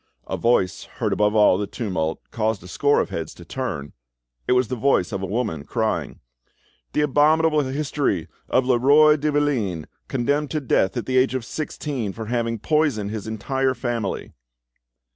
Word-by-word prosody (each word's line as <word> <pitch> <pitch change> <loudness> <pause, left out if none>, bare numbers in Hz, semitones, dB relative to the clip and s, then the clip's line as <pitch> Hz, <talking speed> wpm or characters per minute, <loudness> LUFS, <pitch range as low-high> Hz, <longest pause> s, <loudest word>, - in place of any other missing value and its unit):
A - - -3
voice 115 -6 +1
heard - - -2
above 105 +1 +2
all 105 -3 +5
the 105 - -2
tumult 90 -10 -2
caused 110 -4 -1
a - - -10
score 145 +9 +2
of - - -4
heads 80 -2 -5
to 85 - -13
turn, 95 - -4 0.5
it - - +4
was 125 -1 +3
the 130 - -3
voice 120 -7 +2
of 100 -2 -3
a 95 - -3
woman 105 -8 -2
crying: - - -2 0.7
"The - - +2
abominable 155 +2 +3
history 135 - -1 0.2
of 130 - +2
Leroi 140 +5 +5
de 150 +1 0
Valine, 125 - 0 0.2
condemned 140 +3 0
to 155 - -1
death 115 -7 +1
at 120 - -2
the 130 0 0
age 130 0 +2
of 125 -3 -3
sixteen 135 -7 -4
for 110 +2 -6
having 115 0 -1
poisoned 135 -6 0
his 110 -1 -5
entire 130 +4 -1
family!" 120 -4 -3
120 Hz, 170 wpm, -23 LUFS, 105-140 Hz, 0.7 s, all